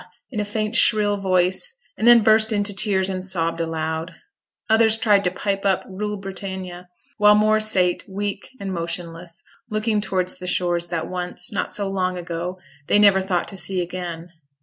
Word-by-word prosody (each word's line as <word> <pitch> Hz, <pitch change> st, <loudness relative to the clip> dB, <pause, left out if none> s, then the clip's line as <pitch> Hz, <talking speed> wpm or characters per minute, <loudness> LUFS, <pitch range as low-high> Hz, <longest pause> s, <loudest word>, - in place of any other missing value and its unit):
in 220 Hz, -, -4 dB
a -, -, +1 dB
faint 215 Hz, +1 st, -3 dB
shrill 210 Hz, -2 st, +4 dB
voice, 190 Hz, -, 0 dB, 0.2 s
and 225 Hz, -, 0 dB
then 240 Hz, -2 st, +8 dB
burst 220 Hz, +1 st, +4 dB
into 205 Hz, -1 st, +1 dB
tears 195 Hz, -1 st, +3 dB
and 185 Hz, -1 st, -3 dB
sobbed 165 Hz, -3 st, -1 dB
aloud. 160 Hz, +1 st, -3 dB, 0.5 s
Others 220 Hz, 0 st, +5 dB
tried 210 Hz, -3 st, +3 dB
to -, -, +3 dB
pipe 195 Hz, +2 st, -2 dB
up 195 Hz, -2 st, +1 dB
'Rule 210 Hz, +2 st, -4 dB
Britannia', 190 Hz, -2 st, -7 dB, 0.3 s
while 210 Hz, 0 st, +6 dB
more 215 Hz, +1 st, +3 dB
sate, 185 Hz, -5 st, +3 dB
weak 200 Hz, +1 st, -4 dB
and 195 Hz, -1 st, -4 dB
motionless, 170 Hz, 0 st, -4 dB, 0.3 s
looking 215 Hz, 0 st, 0 dB
towards 185 Hz, -2 st, -2 dB
the 180 Hz, -, -7 dB
shores 175 Hz, -1 st, 0 dB
that 170 Hz, -2 st, -3 dB
once, 180 Hz, 0 st, -4 dB
not 200 Hz, -, -2 dB
so 200 Hz, -1 st, -2 dB
long 185 Hz, -2 st, -1 dB
ago, 175 Hz, +1 st, -5 dB, 0.3 s
they -, -, +4 dB
never 200 Hz, -2 st, +5 dB
thought 185 Hz, -2 st, -1 dB
to 200 Hz, -, -6 dB
see 190 Hz, -1 st, -2 dB
again. 175 Hz, -1 st, -5 dB
190 Hz, 170 wpm, -22 LUFS, 180-210 Hz, 0.5 s, then